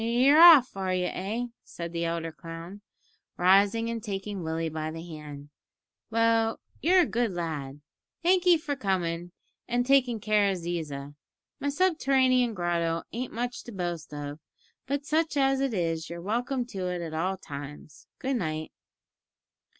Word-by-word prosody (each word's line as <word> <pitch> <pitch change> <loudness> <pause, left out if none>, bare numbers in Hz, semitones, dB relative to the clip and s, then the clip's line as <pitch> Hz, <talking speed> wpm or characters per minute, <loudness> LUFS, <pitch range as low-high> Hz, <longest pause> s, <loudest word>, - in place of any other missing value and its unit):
"You're 255 +7 +5
off, 310 - +9
are 190 -1 -1
you 180 0 0
eh?" 215 +6 -3 0.2
said 170 0 -7
the 170 0 -1
elder 165 0 -2
clown, 165 +4 -9 0.6
rising 200 +5 +4
and 230 -1 -3
taking 200 -1 -4
Willie 165 0 -2
by 155 0 -3
the 165 +1 -7
hand, 150 -3 -9 0.6
"well, 225 0 +2 0.2
you're 365 +4 +5
a - - +3
good 235 -5 -1
lad. 150 -5 -4 0.4
Thank'ee 360 0 +5
for 300 -2 -3
comin' 185 -8 -1
here 175 +1 -11 0.4
an' 245 0 +1
takin' 250 -3 +3
care 210 -1 +2
of 190 - -2
Ziza. 155 -5 -5 0.5
My 285 - -1
subterranean 265 - +2
grotto 170 -2 0
ain't 245 +3 -4
much 245 +2 -4
to 240 - -8
boast 175 -5 -4
of, 145 0 -6 0.5
but 280 +1 -2
such 310 0 0
as 270 -1 +3
it 270 -1 0
is 165 -3 -1
you're 170 0 -6
welcome 240 +7 -1
to 190 -6 -4
it 180 -1 -3
at 160 -1 -6
all 185 +4 -1
times. 145 -2 -10
Good 265 0 -1
night." 155 -5 -3
195 Hz, 160 wpm, -28 LUFS, 165-245 Hz, 0.6 s, off